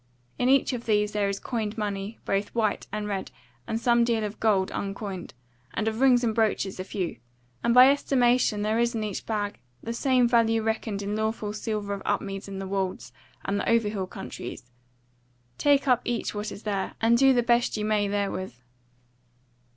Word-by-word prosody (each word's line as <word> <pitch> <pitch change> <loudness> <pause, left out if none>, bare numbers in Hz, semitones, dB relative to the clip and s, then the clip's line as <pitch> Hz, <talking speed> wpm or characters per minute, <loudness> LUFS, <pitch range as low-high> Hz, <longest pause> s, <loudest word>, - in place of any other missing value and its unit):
In 250 - +2
each 275 0 +4
of 240 -1 -5
these 210 -1 +2
is - - -18
there 205 -1 +1
coined 220 +1 -3
money, 205 0 -3
both 200 +3 -1
white 215 -3 0
and 210 0 -3
red, 195 -2 -3 0.4
and 225 - -1
some 235 0 +3
deal 230 -2 +1
of 210 0 -5
gold 200 -4 +2
uncoined, 195 - -5 0.4
and 220 - -1
of 220 +2 -1
rings 255 -2 +5
and 225 -2 +1
brooches 215 -4 0
a - - -2
few, 185 -2 -4 0.5
and - - +2
by 250 +2 +9
estimation 245 -6 +2
there 215 +2 +1
is 235 0 +1
in 220 - -1
each 210 -3 -5
bag 210 -2 -2 0.2
the 230 - -3
same 255 0 +3
value 225 -2 +3
reckoned 220 -2 -2
in 205 +1 -2
lawful 220 -1 -2
silver 210 -2 -3
of 200 - -5
Upmeads 195 -1 -2
and 195 -1 -6
the 195 - -4
Wolds 185 - -3 0.3
and 200 +1 0
the - - -1
Overhill 210 -4 +1
Countries. 125 -7 -8 0.9
Take 285 -1 +3
up 250 -2 +4
each 240 -2 -2
what 210 0 -4
there 200 -2 -3
is, - - -14
and 230 +1 +4
do 270 +2 +6
the 245 -2 +3
best 240 -1 +2
ye 210 - -2
may 210 -1 +1
therewith." 200 -7 -2
215 Hz, 190 wpm, -26 LUFS, 200-235 Hz, 0.9 s, by